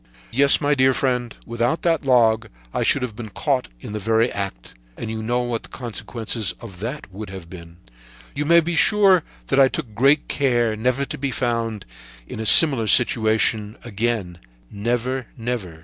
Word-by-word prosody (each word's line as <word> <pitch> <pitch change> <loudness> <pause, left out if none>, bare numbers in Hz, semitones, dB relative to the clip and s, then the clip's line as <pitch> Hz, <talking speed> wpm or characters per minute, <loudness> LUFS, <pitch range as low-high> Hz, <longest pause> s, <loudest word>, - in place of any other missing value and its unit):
"Yes, 140 +3 +5
my 145 -1 +1
dear 130 -2 +3
friend, 125 -3 -1
without 120 +6 -2
that 165 -3 +1
log, 115 -4 +3 0.3
I - - -1
should - - +2
have 120 -4 -5
been 110 -1 -8
caught 130 +5 -1
in - - -8
the 105 - -4
very 115 +3 +1
act, 95 -12 -6 0.2
and 110 - -5
you 110 0 -5
know 120 +3 -1
what 120 -2 -3
the - - -15
consequences 115 -2 -4 0.6
would 100 +1 -8
have 95 -3 -10
been! 85 -2 -12 0.6
"You 145 - -2
may 170 +2 +5
be 170 +1 -3
sure 195 0 +4 0.3
that 135 - +2
I 135 - +7
took 130 -6 -6
good 140 +7 +3
care 120 -5 0
never 125 +5 -1
to - - -7
be 140 0 -2
found 115 -4 -2 0.4
in - - -8
a 110 - -1
similar 135 -7 +7
situation 110 -2 +2
again, 105 -5 -3 0.3
never, 120 +4 -2
never. 115 -9 -5
120 Hz, 170 wpm, -21 LUFS, 110-130 Hz, 0.6 s, I